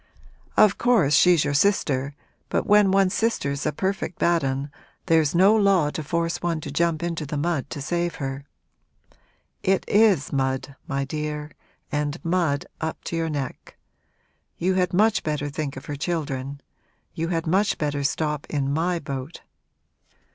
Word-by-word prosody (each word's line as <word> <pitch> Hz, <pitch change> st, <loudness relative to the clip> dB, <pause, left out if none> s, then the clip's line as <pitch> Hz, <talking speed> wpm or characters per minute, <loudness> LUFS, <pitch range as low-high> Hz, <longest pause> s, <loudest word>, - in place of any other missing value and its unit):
'Of 215 Hz, -2 st, +5 dB
course 220 Hz, -, +3 dB
she's 175 Hz, +2 st, +5 dB
your 145 Hz, -, 0 dB
sister, 140 Hz, -5 st, +1 dB, 0.3 s
but -, -, 0 dB
when 210 Hz, -1 st, +5 dB
one's 195 Hz, 0 st, +3 dB
sister's 140 Hz, -12 st, -1 dB
a -, -, +1 dB
perfect 190 Hz, +2 st, -2 dB
bad 170 Hz, -2 st, +2 dB
'un 135 Hz, +1 st, -2 dB, 0.3 s
there's 160 Hz, -3 st, +3 dB
no 195 Hz, +5 st, +6 dB
law 195 Hz, -8 st, +3 dB
to 155 Hz, -, -4 dB
force 165 Hz, +3 st, -1 dB
one 170 Hz, -2 st, -1 dB
to 145 Hz, -, -6 dB
jump 165 Hz, +1 st, 0 dB
into 170 Hz, -2 st, -2 dB
the 145 Hz, 0 st, -4 dB
mud 145 Hz, -2 st, -1 dB
to 145 Hz, -, -6 dB
save 175 Hz, +2 st, -1 dB
her. 135 Hz, 0 st, -4 dB, 1.2 s
It 190 Hz, 0 st, +1 dB
is 205 Hz, -10 st, +3 dB
mud, 135 Hz, 0 st, -1 dB
my 140 Hz, -3 st, -1 dB
dear, 150 Hz, +1 st, -4 dB, 0.4 s
and 150 Hz, +1 st, -1 dB
mud 165 Hz, -5 st, +1 dB, 0.2 s
up 160 Hz, 0 st, -4 dB
to -, -, -4 dB
your 165 Hz, -1 st, -1 dB
neck. 140 Hz, -4 st, -5 dB, 0.8 s
You 185 Hz, +2 st, +1 dB
had 185 Hz, -1 st, +1 dB
much 215 Hz, +4 st, +3 dB
better 150 Hz, -1 st, -2 dB
think 145 Hz, -2 st, -4 dB
of 135 Hz, -, -9 dB
her 145 Hz, -, -4 dB
children 140 Hz, -3 st, -3 dB, 0.5 s
you 165 Hz, +1 st, -2 dB
had 165 Hz, -2 st, -1 dB
much 195 Hz, +5 st, +2 dB
better 145 Hz, -2 st, -1 dB
stop 150 Hz, 0 st, -1 dB
in 140 Hz, -2 st, -1 dB
my 170 Hz, +3 st, 0 dB
boat.' 140 Hz, -1 st, -6 dB
155 Hz, 160 wpm, -24 LUFS, 140-180 Hz, 1.2 s, no